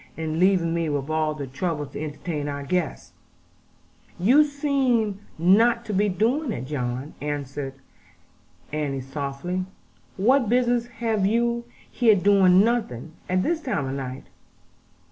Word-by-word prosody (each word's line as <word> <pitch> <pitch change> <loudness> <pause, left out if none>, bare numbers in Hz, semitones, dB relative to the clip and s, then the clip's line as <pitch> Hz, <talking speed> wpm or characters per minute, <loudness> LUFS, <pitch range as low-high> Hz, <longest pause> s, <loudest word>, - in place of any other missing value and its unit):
And 160 0 -2
leaving 180 -3 +3
me 165 -2 0
with 145 0 -2
all 155 -1 0
the 145 -2 -5
trouble 150 +3 -3
to 140 +2 -7
entertain 150 0 -4
our 140 -1 -4
guests!' 170 +2 -2 1.0
'You 250 - +5
seem 270 -8 0 0.2
not 230 +8 +4
to 215 - -4
me 200 +2 +3
to - - +1
be 185 - -5
doing 250 - +1
it, 130 - -4
John,' 130 0 -4
Annie 145 0 -1 1.4
answered 140 -3 -2
softly; 140 +7 -4 0.5
'what 245 +4 +3
business 240 -1 +2
have 225 -4 0
you 235 +2 +1 0.3
here 225 -4 +4
doing 190 -1 +5
nothing, 210 - -1 0.2
at 185 0 +2
this 330 0 0
time 205 - -2
of 130 - -3
night?' 130 -1 -5
185 Hz, 145 wpm, -24 LUFS, 145-235 Hz, 1.4 s, You